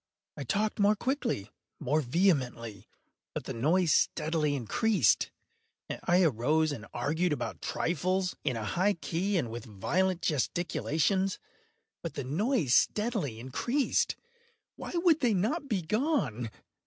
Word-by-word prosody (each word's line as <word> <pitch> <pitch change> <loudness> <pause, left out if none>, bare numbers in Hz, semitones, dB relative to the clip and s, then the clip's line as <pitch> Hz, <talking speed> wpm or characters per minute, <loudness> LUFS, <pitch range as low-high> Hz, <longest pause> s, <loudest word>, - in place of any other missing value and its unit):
I 145 - -5
talked 210 - -1
more 205 +1 +4
quickly—more 155 - -2
vehemently; 125 - 0 0.5
but - - -3
the - - -5
noise 160 +8 +2
steadily 150 0 +1
increased. 145 - +2 0.8
I 180 +2 +4
arose 155 +3 +2
and 115 -6 -6
argued 155 +8 0
about 125 -5 -3
trifles, 185 +3 -1
in 130 -4 0
a 110 - -4
high 185 - +2
key 180 +4 -1
and 120 -9 -1
with 120 +1 -6
violent 175 - 0
gesticulations; 175 - 0 0.6
but - - -6
the 140 - -3
noise 165 - +1
steadily 210 - +1
increased. 240 - 0 0.6
Why - - -7
would 340 -2 +4
they 240 -6 +2
not 275 - -1
be 195 -6 0
gone? 160 - 0
165 Hz, 125 wpm, -30 LUFS, 130-205 Hz, 0.8 s, more